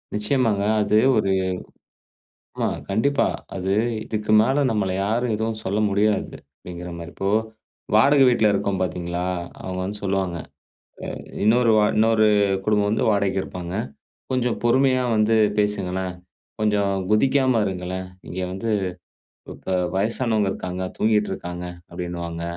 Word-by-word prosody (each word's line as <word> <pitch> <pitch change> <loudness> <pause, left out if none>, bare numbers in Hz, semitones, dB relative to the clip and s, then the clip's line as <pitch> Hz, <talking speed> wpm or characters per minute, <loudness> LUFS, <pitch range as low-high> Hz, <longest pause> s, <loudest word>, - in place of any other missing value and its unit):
நிச்சயமாங்க. 105 -1 +1 0.2
அது 105 +1 +2 0.2
ஒரு 100 -2 +1 1.3
ஆமா - - 0 0.2
கண்டிப்பா 125 +8 +2 0.3
அது, 95 0 -1 0.3
"இதுக்கு 105 -1 -3
மேல 135 +6 +2
நம்மள 100 -4 0
யாரும் 115 +2 0
எதுவும் 110 0 -3
சொல்ல 100 +3 0
முடியாது" 105 +1 +1 0.2
அப்டிங்கிற 90 0 -8
மாரி, 85 0 -8
இப்போ 95 - -1 0.7
வாடகை 135 +5 +6
வீட்ல 110 -3 +3
இருக்கோம் 100 -1 -1
பாத்தீங்களா, 90 0 -2 0.4
அவங்க 95 0 -5
வந்து 100 +3 -4
சொல்லுவாங்க, 95 -3 -1 0.8
அ - - -7 0.3
இன்னொரு 115 +2 +4
வா 105 - +5
இன்னொரு 110 0 +4 0.4
குடும்பம் 105 -1 +2
வந்து 110 - 0
வாடகைக்கு 100 -2 +1
இருப்பாங்க, 90 -1 -6 0.6
"கொஞ்சம் 125 -2 0
பொறுமையா 130 +2 +3
வந்து 110 +1 +3 0.2
பேசுங்களேன், 95 -3 -1 0.5
கொஞ்சம் 105 -2 +2 0.2
குதிக்காம 130 +1 +3
இருங்களேன், 95 0 -4 0.2
இங்க 90 - -5
வந்து 95 +5 -3 0.8
இப்ப - - -6 0.2
வயசானவங்க 110 0 +1
இருக்காங்க, 90 0 -5 0.2
தூங்கிகிட்ருக்காங்க" 105 -5 -1 0.3
அப்டின்னுவாங்க, 85 -1 -5
105 Hz, 120 wpm, -23 LUFS, 95-110 Hz, 1.3 s, வாடகை